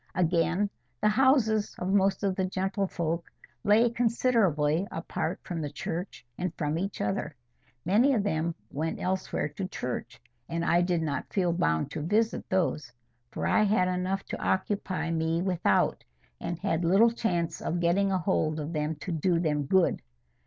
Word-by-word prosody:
Again, 175 +3 +2 0.3
the 210 - +3
houses 220 -3 +3
of 185 +2 -2
most 195 0 +2
of 195 -2 +1
the 190 - 0
gentlefolk 185 -3 -1 0.4
lay 215 +3 +5
considerably 205 - +2
apart - - -3
from 170 -3 -4
the 150 - -3
church 165 +1 -5
and 180 -1 -1
from 150 +2 -1
each 195 +1 -3
other. 105 +8 -2 0.5
Many 235 +10 +4
of 210 - +1
them 165 -4 -1 0.2
went 160 +3 -2
elsewhere 185 -3 -1
to 185 +6 -5
church, 125 -9 -5 0.3
and 170 0 -2
I 175 - +4
did 175 -2 +1
not 140 -4 -3
feel 180 -4 +1
bound 80 - 0
to - - -4
visit 215 +8 0
those, 165 -8 0 0.4
for - - -4
I - - +3
had 205 -3 +3
enough 185 +2 -1
to - - -4
occupy 190 -3 -1
me 165 +1 0
without, 185 -3 +1 0.4
and 170 - -3
had 165 0 -1
little 195 +7 +5
chance 175 -8 -1
of 175 - -1
getting 185 +4 +2
a 190 - +2
hold 160 -3 0
of 150 +3 -4
them 150 0 -1
to 185 - -4
do 170 +1 +1
them 150 -4 0
good. 190 +2 +3
180 Hz, 165 wpm, -28 LUFS, 160-200 Hz, 0.5 s, lay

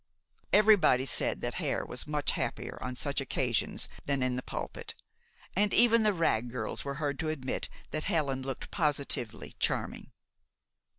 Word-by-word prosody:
Everybody 205 -11 +6
said - - +1
that - - -2
Hare - - -1
was - - -5
much 150 -1 0
happier - - -3
on 125 0 -4
such 140 +2 -1
occasions 125 -4 0 0.2
than 140 -2 +1
in 130 -1 +1
the 125 - -2
pulpit, - - -6 0.6
and 205 +2 +3
even 230 -1 +6
the 215 -1 +4
Wragg 125 - +1
girls 125 +1 -3
were 140 0 -3
heard 145 -2 -2
to 160 - -1
admit 135 -4 -3 0.2
that 155 - -1
Helen 145 -8 0
looked 135 -1 -5
positively 140 -7 0
charming. - - -1
140 Hz, 155 wpm, -31 LUFS, 130-165 Hz, 0.6 s, Everybody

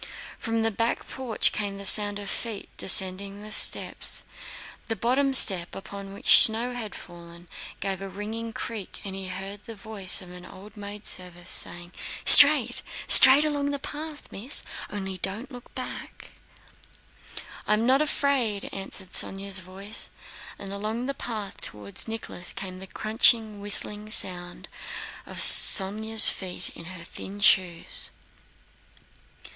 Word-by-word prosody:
From 225 -1 -3
the 225 - -1
back 230 +3 -3
porch 255 -4 -3
came 200 -2 -5
the 200 - -9
sound 205 +1 +6
of 205 -1 -8
feet 220 0 -5
descending 195 +2 +2
the 215 - -11
steps, - - 0 0.6
the 225 - -3
bottom 265 +5 -1
step 190 -9 +4
upon 195 0 -10
which 200 - +5
snow 230 +3 +2
had 225 -4 -8
fallen 170 0 -13 0.3
gave 195 -1 -4
a 195 - -7
ringing 220 +4 -7
creak 220 -3 -8
and 195 - -7
he 195 -1 -8
heard 195 +2 -9
the 230 - -10
voice 205 -3 -1
of 180 -2 -12
an 180 0 -12
old 200 +4 -14
maidservant 195 -4 -8
saying, 175 -1 -3 0.3
"Straight, - - +8 0.3
straight, 270 +3 +8
along 290 -1 -3
the 285 - -3
path, 300 +2 -8
Miss. 235 +9 -3 0.3
Only, 190 -2 -6
don't 205 +10 -3
look 245 -1 -13
back." - - -10 1.4
"I 210 - +2
am 220 +2 -2
not 265 +3 +2
afraid," 270 -8 -1
answered 195 -1 -8
Sónya's 195 +1 -3
voice, 190 +3 -7 0.5
and 195 0 -8
along 215 +4 -5
the 275 - -4
path 220 -7 -7
toward 105 - -9
Nicholas 220 -5 -6
came 190 -2 -8
the 190 - -10
crunching, 215 0 0
whistling 210 +1 +1
sound 175 -4 -2 0.6
of - - -10
Sónya's 215 +3 +6
feet 185 -2 -1
in 170 - -11
her 180 -1 -11
thin 195 +3 -10
shoes. 185 -5 +1
205 Hz, 140 wpm, -24 LUFS, 190-225 Hz, 1.4 s, Straight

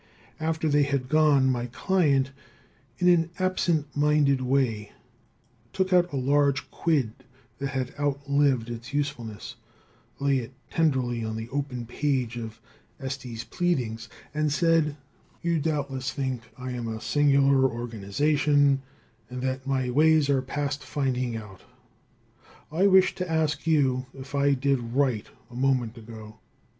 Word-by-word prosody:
After 160 0 -1
they 145 -1 +3
had 140 -2 0
gone, 145 -4 +4
my 120 -1 -2
client, 140 - +1 0.7
in 180 - +1
an 170 -2 +4
absent 175 -5 0
minded 145 -2 +3
way, 125 -6 0 0.8
took 190 -1 0
out 180 0 +4
a - - -4
large 140 +1 +1
quid 145 -10 +1 0.5
that 140 - -2
had 130 -2 -3
outlived 140 -4 +1
its 120 +4 -7
usefulness, 120 -8 -4 0.6
laid 140 -1 +2
it 120 +2 -10 0.2
tenderly 130 -7 +1
on 110 0 -3
the 110 +1 -6
open 130 -3 -3
page 130 -2 -1
of 115 -2 -7 0.4
Estey's 130 -4 -5
Pleadings, 125 -5 -2 0.2
and 150 0 0
said: 160 -1 +2 0.5
"You 170 -1 +1
doubtless 140 -4 -2
think 130 -4 -3
I 130 0 -5
am 120 -2 -4
a 110 -1 -4
singular 140 0 +3
organization, 135 +6 +1 0.5
and 125 0 -6
that 130 +1 -2
my 130 -2 0
ways 155 +1 +4
are 135 -2 +2
past 145 +1 -3
finding 130 -4 -1
out. 105 -4 -10 1.1
I 180 +6 +3
wish 190 -1 +5
to 180 -2 -4
ask 155 -1 0
you 130 -5 +2
if 135 +1 -10
I 140 0 +3
did 135 0 +1 0.2
right 130 -6 +1 0.2
a - - -11
moment 125 -3 +1
ago?" 110 -1 -11
135 Hz, 135 wpm, -26 LUFS, 125-150 Hz, 1.1 s, wish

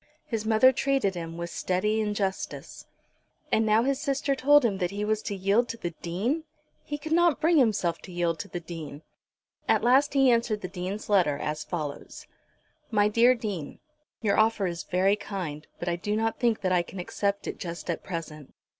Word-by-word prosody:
His 220 -2 -3
mother 225 +4 +6
treated 270 -6 +1
him, 165 -2 -6
with 170 0 -5
steady 210 +4 0
injustice. 205 -3 -3 0.6
And 220 0 +3
now 215 +2 +4
his 275 +1 0
sister 275 -1 0
told 285 +1 +5
him 200 -4 0
that 180 -2 0
he 205 +2 -3
was 215 0 0
to 205 - -4
yield 200 +5 +2
to 230 - -4
the 175 -6 -4
Dean! 220 - -1 0.4
He 295 - -4
could 310 +2 -8
not 340 -2 +4
bring 325 0 +4
himself 210 -9 +2
to 185 - -12
yield 170 -2 -1
to - - -5
the 175 - -5
Dean. 160 -3 -8 0.7
At - - +3
last 270 +4 +4
he 270 -2 +5
answered 230 -3 +1
the 185 - -4
Dean's 185 +3 -5
letter 175 -9 +3
as 150 +1 -3
follows; 150 -5 -6 0.6
"MY 210 -2 +3
DEAR 235 +4 +5
DEAN, 200 -10 -5 0.5
"Your 205 -1 +2
offer 220 -2 +3
is 170 -2 -3
very 190 +3 +2
kind, 175 -8 -6
but 175 - -5
I 170 0 0
do 205 +4 -2
not 225 +1 -1
think 235 -3 +1
that 185 -1 0
I 180 -1 +4
can 175 +2 -10
accept 200 +3 -2
it - - -5
just 170 -2 -6
at 170 - -2
present. 155 -5 -7
205 Hz, 195 wpm, -27 LUFS, 175-235 Hz, 0.7 s, mother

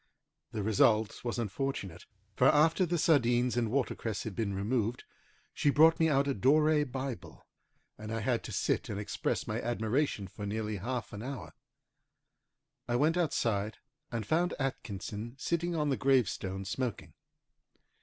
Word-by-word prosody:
The 110 -4 -3
result 110 0 +2
was 120 0 -2
unfortunate, 105 -5 -3 0.3
for 125 - +4
after 160 +5 +4
the 175 +1 0
sardines 125 -7 +3
and 120 -2 +1
watercress 115 -4 -1
had 110 -4 -6
been 105 -4 -1
removed, 110 +3 -1 0.5
she 145 - +2
brought 160 +3 +6
me 160 0 +4
out 140 -1 +2
a 140 - +1
Dore 150 +6 +4
Bible, 130 - -6 0.5
and 110 0 -6
I 115 0 -2
had 120 +1 0
to - - -6
sit - - 0
and 100 - -3
express 105 - -2
my - - -2
admiration 120 -1 -1
for 100 +2 -7
nearly 105 0 -2
half 120 +3 -4
an 100 - -6
hour. 120 - -6 1.3
I 120 - 0
went 150 +6 +3
outside, 110 - 0 0.3
and 115 -3 -3
found 170 - +1
Atkinson 115 -3 -4
sitting 170 +4 -1
on 150 -2 +1
the 135 - +1
gravestone 100 -7 +1
smoking. 125 +4 -3
120 Hz, 150 wpm, -31 LUFS, 105-140 Hz, 1.3 s, brought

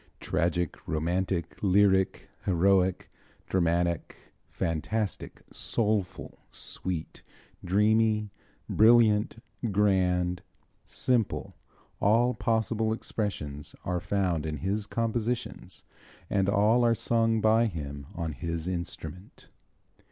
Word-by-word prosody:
"Tragic, 85 0 -1
romantic, 85 +2 -1
lyric, 95 -1 +3 0.2
heroic, 95 0 +2 0.4
dramatic, 85 -2 0 0.3
fantastic, 95 +6 -3
soulful, 105 -4 -1
sweet, 90 -4 -5 0.4
dreamy, 105 +2 +2 0.4
brilliant, 110 -1 +4 0.3
grand, 90 -3 +2 0.5
simple, 120 -5 0 0.5
all 115 +5 +3
possible 110 -1 0
expressions 75 -11 -4
are 90 -1 0
found 90 -4 -1
in 75 -1 -3
his 100 +6 -2
compositions 115 +2 -3 0.5
and 95 -1 +2
all 105 +4 +4
are 115 -1 +4
sung 115 -1 +1
by 110 +2 +4
him 70 -7 -6
on 85 -2 -3
his 85 +5 -4
instrument." 90 0 -6
95 Hz, 85 wpm, -28 LUFS, 85-110 Hz, 0.5 s, brilliant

